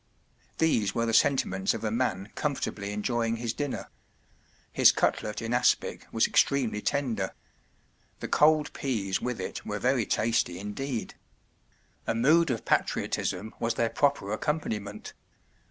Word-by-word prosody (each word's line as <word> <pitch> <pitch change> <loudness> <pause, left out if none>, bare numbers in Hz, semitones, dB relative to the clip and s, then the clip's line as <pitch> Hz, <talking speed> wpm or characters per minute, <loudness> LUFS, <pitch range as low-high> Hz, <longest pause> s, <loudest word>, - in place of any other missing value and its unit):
” - - -36
These 115 -11 +2
were 115 - +1
the 115 - -1
sentiments 110 -7 +2
of 115 - -6
a 110 - -1
man 110 -4 -1
com¬ 145 -2 -1
fortably 100 -1 -4
enjoying 115 +2 -1
his 115 0 -3
dinner. 145 -2 -4 0.8
His - - +6
cutlet 105 +2 -1
in 115 +1 -2
aspic 125 0 +1
was 115 - +3
extremely 125 -7 +2
tender; 115 -9 -1 0.8
the - - -4
cold 150 0 +3
peas 105 -8 -2
with 125 -3 -3
it 95 - -5
were 105 - -3
very 125 0 +1
tasty 110 -5 +1
indeed. 110 +5 -4 0.9
A - - +1
mood 155 +8 +4
of 120 -3 -2
patriotism 100 +4 -1
was 115 0 0
their 115 -1 +1
proper 140 -8 +1
accompaniment. 105 -5 -3
115 Hz, 140 wpm, -28 LUFS, 105-135 Hz, 0.9 s, His